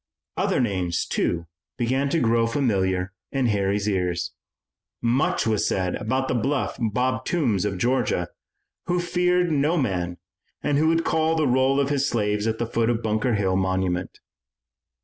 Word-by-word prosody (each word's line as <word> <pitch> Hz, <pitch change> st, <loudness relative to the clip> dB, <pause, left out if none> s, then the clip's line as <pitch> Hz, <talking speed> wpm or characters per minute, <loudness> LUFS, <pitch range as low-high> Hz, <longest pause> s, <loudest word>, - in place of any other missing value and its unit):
Other -, -, +1 dB
names, 95 Hz, -8 st, 0 dB
too, 85 Hz, -1 st, -1 dB, 0.3 s
began 130 Hz, +4 st, 0 dB
to 165 Hz, -, +1 dB
grow 115 Hz, -2 st, +2 dB
familiar 95 Hz, -7 st, 0 dB, 0.2 s
in 135 Hz, -2 st, 0 dB
Harry's 100 Hz, -2 st, +1 dB
ears. 90 Hz, -3 st, -1 dB, 0.7 s
Much 120 Hz, +5 st, +1 dB
was 110 Hz, -2 st, +1 dB
said 90 Hz, -2 st, 0 dB
about 130 Hz, +5 st, -1 dB
the -, -, 0 dB
bluff 135 Hz, +4 st, 0 dB
Bob 125 Hz, +2 st, 0 dB
Toombs 120 Hz, -, 0 dB
of 100 Hz, -2 st, -2 dB
Georgia, 105 Hz, -5 st, 0 dB, 0.6 s
who 180 Hz, 0 st, +1 dB
feared 180 Hz, 0 st, +1 dB
no 150 Hz, +3 st, +2 dB
man 90 Hz, -, -1 dB, 0.5 s
and 145 Hz, -1 st, +2 dB
who 160 Hz, -, +3 dB
would 165 Hz, 0 st, +2 dB
call 160 Hz, 0 st, +2 dB
the 160 Hz, -2 st, +2 dB
roll 130 Hz, +2 st, +3 dB
of 140 Hz, 0 st, +1 dB
his 140 Hz, 0 st, +1 dB
slaves 105 Hz, -1 st, 0 dB
at 110 Hz, 0 st, 0 dB
the 120 Hz, -, -1 dB
foot 115 Hz, 0 st, 0 dB
of 120 Hz, -1 st, -1 dB
Bunker 110 Hz, +2 st, +1 dB
Hill 95 Hz, -2 st, +1 dB
monument. 95 Hz, -1 st, -1 dB
115 Hz, 160 wpm, -24 LUFS, 95-140 Hz, 0.7 s, who